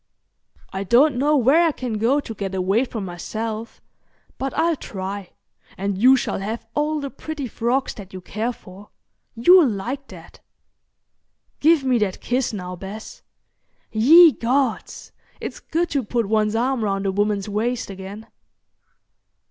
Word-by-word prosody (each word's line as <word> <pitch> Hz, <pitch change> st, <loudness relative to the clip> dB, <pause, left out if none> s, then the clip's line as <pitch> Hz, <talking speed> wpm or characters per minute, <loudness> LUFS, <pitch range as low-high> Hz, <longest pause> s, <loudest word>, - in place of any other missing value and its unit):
"I 190 Hz, +1 st, -2 dB
don't 255 Hz, +8 st, +4 dB
know 295 Hz, +3 st, +3 dB
where 270 Hz, +6 st, +4 dB
I -, -, +2 dB
can 245 Hz, -6 st, -4 dB
go 250 Hz, +6 st, +3 dB
to 225 Hz, -, -7 dB
get 195 Hz, -2 st, -4 dB
away 195 Hz, +7 st, +1 dB
from 220 Hz, -5 st, -5 dB
myself, 215 Hz, +5 st, -5 dB, 0.6 s
but 270 Hz, 0 st, -2 dB
I'll 335 Hz, 0 st, +2 dB
try, 195 Hz, -, -6 dB, 0.5 s
and 200 Hz, +1 st, -2 dB
you 255 Hz, +7 st, +6 dB
shall 245 Hz, -, -2 dB
have 220 Hz, +4 st, -4 dB
all 300 Hz, +1 st, 0 dB
the 280 Hz, -2 st, -5 dB
pretty 300 Hz, -1 st, -6 dB
frocks 245 Hz, +4 st, -1 dB
that 200 Hz, -3 st, -11 dB
you 185 Hz, -, -7 dB
care 215 Hz, +6 st, -3 dB
for. 200 Hz, -3 st, -14 dB, 0.5 s
You'll 330 Hz, +5 st, +6 dB
like 245 Hz, +7 st, -4 dB
that. -, -, -13 dB, 1.2 s
Give 315 Hz, -1 st, +4 dB
me 255 Hz, -2 st, +2 dB
that 200 Hz, -3 st, -1 dB
kiss 250 Hz, +1 st, -1 dB
now, 180 Hz, -4 st, -6 dB
Bess. 200 Hz, +4 st, -9 dB, 0.7 s
Ye 315 Hz, +10 st, +8 dB
gods! 255 Hz, -1 st, -2 dB, 0.3 s
it's -, -, -6 dB
good 335 Hz, +2 st, -2 dB
to 280 Hz, -2 st, 0 dB
put 230 Hz, +1 st, -1 dB
one's 215 Hz, 0 st, +1 dB
arm 245 Hz, +1 st, 0 dB
round 195 Hz, -1 st, -1 dB
a 195 Hz, -, +1 dB
woman's 205 Hz, 0 st, 0 dB
waist 220 Hz, +2 st, -2 dB
again." 195 Hz, +3 st, -9 dB
225 Hz, 150 wpm, -22 LUFS, 200-270 Hz, 1.2 s, Ye